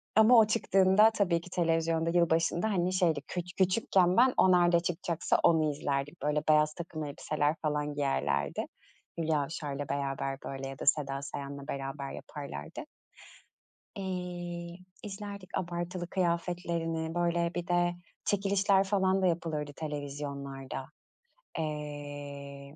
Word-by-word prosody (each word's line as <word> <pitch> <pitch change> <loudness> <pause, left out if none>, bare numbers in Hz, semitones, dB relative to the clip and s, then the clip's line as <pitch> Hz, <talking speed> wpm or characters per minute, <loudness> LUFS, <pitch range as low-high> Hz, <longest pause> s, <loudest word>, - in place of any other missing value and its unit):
Ama 220 +3 +7
o 220 -2 +7
çıktığında, 210 -1 +5
tabii 180 -6 +1
ki, 180 - -12
televizyonda 165 -1 +1
yılbaşında, 170 +3 +2
hani, 180 -1 +1
şeydi 170 -6 +2
küç 180 0 -5
küçükken, 185 -1 +3
ben 255 +1 +6
o 185 - +6
nerede 175 -1 +5
çıkacaksa 170 -1 0
onu 155 -2 +4
izlerdik, 140 +3 -3
böyle 150 +1 +1
beyaz 150 0 +4
takım 165 -2 -6
elbiseler 150 +1 -1
falan 150 -1 -1
giyerlerdi. 70 - 0 0.5
Hülya 155 -2 +1
Avşar'la 145 -2 -4
beraber, 135 -1 -2
böyle, 135 0 -5
ya 135 - -9
da - - -5
Seda 140 -1 +2
Sayan'la 140 0 -6
beraber 135 0 -4
yaparlardı. 140 - -7 1.1
İii, 180 -1 -5 0.2
izlerdik 200 -2 -6
abartılı 175 0 -3
kıyafetlerini, 170 -2 -1
böyle 170 0 +1
bir 175 -1 -3
de 175 0 +2 0.3
çekilişler 200 -1 +3
falan 190 -1 +2
da - - +4
yapılırdı 160 -4 -1
televizyonlarda. 140 -2 -5 0.7
Eee. 145 -2 -6
165 Hz, 120 wpm, -30 LUFS, 145-180 Hz, 1.1 s, Ama